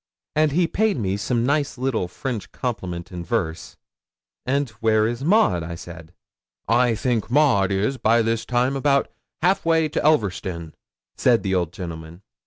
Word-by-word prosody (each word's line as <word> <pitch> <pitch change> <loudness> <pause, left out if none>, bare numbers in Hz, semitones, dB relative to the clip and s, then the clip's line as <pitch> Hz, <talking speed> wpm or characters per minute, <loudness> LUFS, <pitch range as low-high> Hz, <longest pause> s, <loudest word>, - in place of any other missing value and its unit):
'And 155 -1 +3
he 175 +3 +3
paid 205 +4 +1
me 100 -4 -1
some 115 +3 -1
nice 145 0 0
little 125 -7 -1
French 115 +4 -5
compliment 95 -8 -4
in 90 -1 -6
verse. 85 -4 -3 0.7
'"And 140 -1 0
where 110 -1 +3
is 120 +3 -4
Maud?" 160 - +3 0.2
said 85 -1 -11 0.6
I. 120 +2 +3
'"I 115 - +1
think 115 -1 -1
Maud 120 -9 +3
is 105 +8 0
by 115 0 +3
this 115 0 0
time 125 +2 0
about 140 0 +1 0.3
halfway 165 -4 +2
to - - -2
Elverston," 95 - 0 0.4
said 120 -3 +3
the 95 -2 -1
old 90 -3 0
gentleman. 85 0 -8
115 Hz, 155 wpm, -23 LUFS, 95-140 Hz, 0.7 s, And